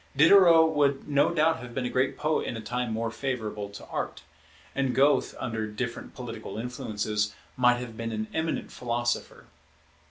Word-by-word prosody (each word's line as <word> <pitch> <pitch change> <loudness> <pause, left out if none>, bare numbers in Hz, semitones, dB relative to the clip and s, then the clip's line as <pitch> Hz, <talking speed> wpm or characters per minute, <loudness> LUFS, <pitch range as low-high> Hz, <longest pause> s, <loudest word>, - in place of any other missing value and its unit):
Diderot 165 +1 +7
would 140 -2 +1
no 145 +1 +3
doubt 160 -1 +2
have 125 -1 -9
been 130 - -1
a - - -1
great 130 +1 +1
poet 155 +1 0
in 120 - -3
a - - -5
time 125 +2 -2
more 115 +1 -2
favourable 110 -5 -3
to 100 - -10
art; - - -4 0.5
and 135 -2 0
Goethe, 140 +2 +3
under 110 -3 -2
different 115 +3 -5
political 115 -4 -7
influences, 105 -3 -2 0.2
might 125 -1 +4
have 120 -2 -7
been 115 +1 -4
an 110 0 -2
eminent 160 0 -2
philosopher. 120 0 -2
125 Hz, 165 wpm, -27 LUFS, 110-140 Hz, 0.5 s, Diderot